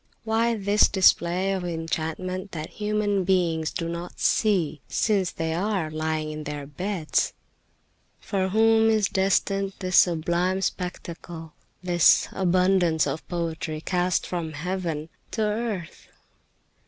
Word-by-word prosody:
Why 230 +1 +1
this 205 0 +3
display 185 0 +3
of 190 -2 -3
enchantments 170 +3 -3
that 155 -1 -5
human 210 -2 0
beings 170 -4 +1
do 165 - -4
not 170 +1 -6
see, 175 -9 +1
since 200 -5 +1
they 160 0 -3
are 185 -2 -1
lying 155 0 -2
in 155 0 -6
their 145 -1 -5
beds? 170 +3 -1 0.9
For 190 -2 -1
whom 225 +2 +4
is 215 -3 +3
destined 195 0 +1
this 185 -1 0
sublime 175 +3 +1
spectacle, 170 -3 -5 0.3
this 175 -2 +4
abundance 180 -3 +2
of 160 - -4
poetry 165 -2 -3
cast 180 +2 0
from 165 -3 -4
heaven 165 -1 -3 0.2
to 220 - 0
earth?" 210 -5 -3
180 Hz, 120 wpm, -25 LUFS, 160-195 Hz, 0.9 s, whom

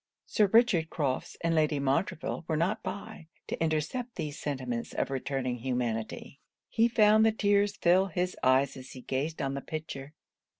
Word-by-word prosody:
Sir 210 - +3
Richard 200 -7 +4
Crofts 140 -5 -2
and 165 0 +1
Lady 155 -2 +2
Montreville 140 +5 -1
were 160 - 0
not 175 +6 0
by, 195 -1 -7 0.2
to - - -3
intercept 165 - -2
these 150 -2 -4
sentiments 130 -5 -3
of - - -1
returning 130 -2 -2
humanity. 120 +1 -3 0.3
He 230 0 +3
found 215 -2 +5
the 225 - +5
tears 205 -1 +2
fill 185 +2 +3
his 180 +1 -2
eyes 130 +2 +3
as 130 -1 -10
he 130 - -9
gazed 140 +5 -2
on 135 0 -1
the 140 - -4
picture. 150 -2 -7
155 Hz, 165 wpm, -29 LUFS, 135-195 Hz, 0.3 s, found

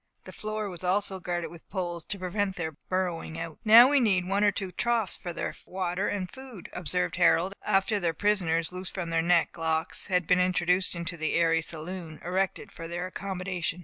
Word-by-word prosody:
The - - -11
floor 215 0 -3
was 180 -2 -8
also 190 +1 +2
guarded 175 -1 -3
with 170 -1 -14
poles, 175 -4 -3
to 200 - -4
prevent 190 +1 -1
their 160 -2 -3 0.2
burrowing 180 -3 -2
out. 165 -2 -6
"Now 230 +3 +9
we 285 +1 +4
need 190 -7 +2
one 200 +2 +1
or 205 - +5
two 190 -2 -4
troughs 230 -1 0
for 175 - -6
their - - -3
water 185 +1 -2
and 195 -3 -2
food," 255 -4 -11
observed 180 +1 -1
Harold, 180 +1 +4
after 205 +1 +2
the 170 -3 +1
prisoners, 165 -3 +1
loosed 185 0 -4
from 175 -3 -3
their 165 0 +2
neck 170 0 +2
locks, 160 0 0
had 180 -2 +1
been 180 +2 +4
introduced 180 0 +2
into 170 0 -4
the 160 -1 -1
airy 165 -1 +3
saloon 165 0 -6
erected 190 +2 -1
for 165 - -8
their 175 +2 -3
accommodation. 185 -2 -3
180 Hz, 195 wpm, -28 LUFS, 170-195 Hz, 0.2 s, Now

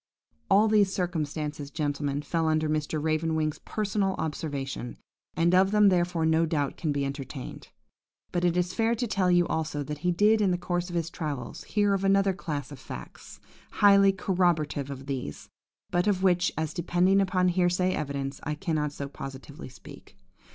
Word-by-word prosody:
"All 210 +3 +5
these 210 -3 +3
circumstances, 150 -5 -3
gentlemen, 145 -1 -2
fell 165 +2 -1
under 155 0 +1
Mr. 155 0 -1
Raven 160 +1 0
wing's 155 -1 -1
personal 200 -2 -1
observation, 140 -5 -4 0.4
and 170 +2 +2
of 190 +1 +5
them, 210 0 +5
therefore, 175 -2 +1
no 160 +1 +3
doubt 145 -3 -1
can 155 - -2
be 140 -1 -1
entertained. 135 -1 -7 0.6
But 175 -1 -1
it 175 0 +2
is 180 0 0
fair 230 0 +1
to 245 - -2
tell 195 -5 +1
you 175 -1 +4
also 155 -3 -2
that 150 +1 -6
he 180 +3 +1
did, 210 +5 +4
in 200 - +3
the 180 - +1
course 175 0 -2
of 175 - -6
his 170 0 -1
travels, 145 -7 -5
hear 205 -1 +1
of 195 0 -1
another 195 0 +3
class 150 -7 -5
of 140 - -9
facts, - - -10 0.3
highly 200 -1 +6
corroborative 175 -7 0
of 135 -1 -7
these, 130 - -5 0.4
but 175 +3 +1
of 190 -2 +1
which, 180 -1 +3
as 160 -1 -2
depending 180 +3 +2
upon 185 -1 +2
hearsay 180 +1 +1
evidence, 140 -1 -3
I 150 - -3
cannot 150 -3 -1
so 140 -1 -6
positively 135 +2 -9
speak. 125 - -14
165 Hz, 175 wpm, -27 LUFS, 150-185 Hz, 0.6 s, highly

